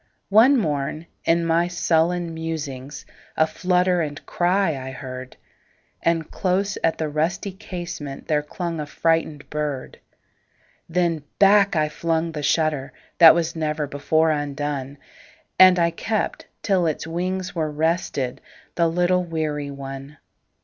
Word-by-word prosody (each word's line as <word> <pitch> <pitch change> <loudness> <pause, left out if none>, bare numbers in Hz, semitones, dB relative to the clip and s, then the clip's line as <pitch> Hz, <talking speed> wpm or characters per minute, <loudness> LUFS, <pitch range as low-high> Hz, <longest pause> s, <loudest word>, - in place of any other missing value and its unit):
One 230 +7 +6
morn, 155 - -2 0.2
in 170 0 +2
my 165 +1 +2
sullen 175 0 +1
musings,A 155 -2 -4
flutter 180 +1 +1
and 150 -2 -5
cry 180 +2 +1
I 130 0 -6
heard; 130 -1 -8 0.6
And 165 -2 0
close 195 +2 0
at 165 - +2
the 160 - -1
rusty 160 +6 -1
casementThere 155 -6 -4
clung 170 0 -4
a 150 - -4
frightened 160 -2 0
bird. 150 -3 -4 0.9
Then 170 -2 +1 0.2
back 200 -1 +5
I 155 -1 +2
flung 165 +2 -1
the 150 -2 -5
shutterThat 155 +2 +3
was 170 -1 -1
never 155 -1 -1
before 155 +3 +1
undone, 145 -2 -3 0.6
And 185 -1 +8
I 170 -1 +3
kept 215 +5 -2 0.2
till 185 -5 +2
its 155 - -2
wings 185 +3 -3
were 155 -3 -1
restedThe 150 -4 -1 0.5
little 180 +1 +2
weary 155 -4 -3
one. 135 +1 -8
160 Hz, 120 wpm, -23 LUFS, 150-175 Hz, 0.9 s, And